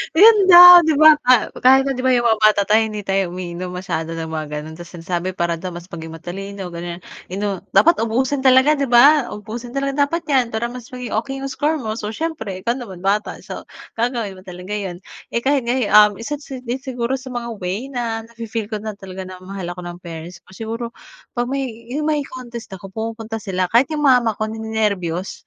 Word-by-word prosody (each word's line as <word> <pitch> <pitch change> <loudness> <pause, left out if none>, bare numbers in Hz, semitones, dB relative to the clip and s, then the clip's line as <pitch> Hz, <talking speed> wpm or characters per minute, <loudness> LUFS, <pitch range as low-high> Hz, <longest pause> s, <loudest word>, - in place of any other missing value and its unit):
Ayun 430 +5 +8
daw 355 -1 +11
di 320 - +3
ba, 310 0 +8
pa 250 -3 +4
kahit 265 +1 +6
na - - +1
di 255 - -4
ba, 260 - +4
yung 240 -1 +2
mga 220 -1 +2
bata 210 -1 +5
tayo 215 +1 +4
hindi 215 -1 -5
tayo 195 -2 0
umiinom 180 0 -6
masyado 165 -3 -4
ng 165 -1 -5
mga 155 -1 -4 0.2
gano'n, 155 +1 -9
tapos 175 0 -11
ang 170 - -9
sinasabi 175 +1 -2
para 170 -2 -1
daw 185 0 -6
mas 175 +1 -10
maging 160 -2 -8
matalino, 190 +3 -7
gano'n, 170 +1 -7 0.3
inu 200 -1 -2
dapat 335 -3 +5
ubusin 260 +5 0
talaga 260 +4 +5
di 280 - 0
ba? 265 +3 +6
"Uubusin 230 +4 -8
talaga 275 +1 +1
dapat 335 +4 -3
’yan 255 -5 +2
para 230 +2 -1
mas 245 -1 -9
maging 250 -3 -6
okey 270 +4 -6
’yung 275 - -4
score 300 +4 0
mo." 220 -2 -3
So, 210 -1 -5
siyempre 295 - -4
ikaw 235 +2 0
naman 195 -8 -9
bata, 205 +2 0
so - - -8 0.3
gagawin 230 -5 -2
mo - - -13
talaga 180 +2 -8
’yon. 190 -4 -5 0.4
Eh, 235 - 0
kahit 275 -1 +1
ngayon, 240 -2 0
um, 210 0 +7
isa't 290 +5 -4
si 260 -2 -8
din 245 +1 -3
siguro 260 -1 -3
sa 255 - -12
mga 235 -1 -4
way 195 +9 -4
na 230 -3 -3
nafi-feel 230 -2 -5
ko 215 - -1
na 215 0 -5
talaga 190 -1 -8
na 185 -1 -11
mahal 190 -1 -7
ako 180 - -9
ng 175 0 -7
parents 170 +1 -8
ko - - -19
siguro 225 +2 -5 0.5
pag 240 0 -1
may, 275 0 -1 0.3
yung 300 +3 -2
may 300 -1 +1
contest 240 -3 -9
ako 195 +1 -9
pumupunta 225 0 -5
sila 185 -3 -1
kahit 245 +5 +4
yung 300 -1 -2
mama 250 -4 +4
ko 215 - -2
ni-nenerbiyos 210 -5 -3
225 Hz, 215 wpm, -20 LUFS, 185-255 Hz, 0.5 s, daw